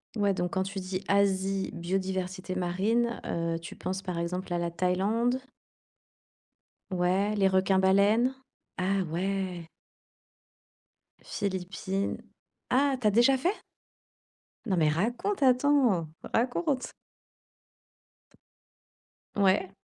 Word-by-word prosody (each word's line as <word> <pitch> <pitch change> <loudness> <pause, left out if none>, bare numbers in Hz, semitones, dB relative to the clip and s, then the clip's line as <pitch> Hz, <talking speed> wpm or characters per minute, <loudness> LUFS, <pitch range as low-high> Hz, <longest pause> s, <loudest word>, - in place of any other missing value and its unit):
Ouais, 205 -2 +2
donc 175 -1 -2
quand 190 0 +1
tu 195 0 -5
dis: 185 +1 -4
«Asie, 195 -1 +1
biodiversité 185 +1 -3
marine» 210 +7 0
heu, 165 0 -2
tu 165 - -9
penses 190 +2 -4
par 180 -3 -4
exemple 180 +1 -3
à - - +1
la 170 0 -2
Thaïlande? 205 +9 +1 1.5
Ouais, 185 +3 +1
les 195 -2 +3
requins 190 0 +3
baleines. 205 +7 +3 0.4
Ah 190 +1 +1
ouais. 180 -1 -2 1.6
Philippines. 190 0 -3 0.5
Ah, 275 +1 +3
tu 215 - +3
as - - +4
déjà 240 +5 +5
fait? 360 +11 0 1.1
Non, 190 -5 0
mais 155 -2 +4
raconte, 245 - -1
attends, 255 - +3 0.3
raconte? 260 +3 0 2.5
T - - -3
ouais. 190 -1 +3
195 Hz, 105 wpm, -29 LUFS, 185-225 Hz, 2.5 s, déjà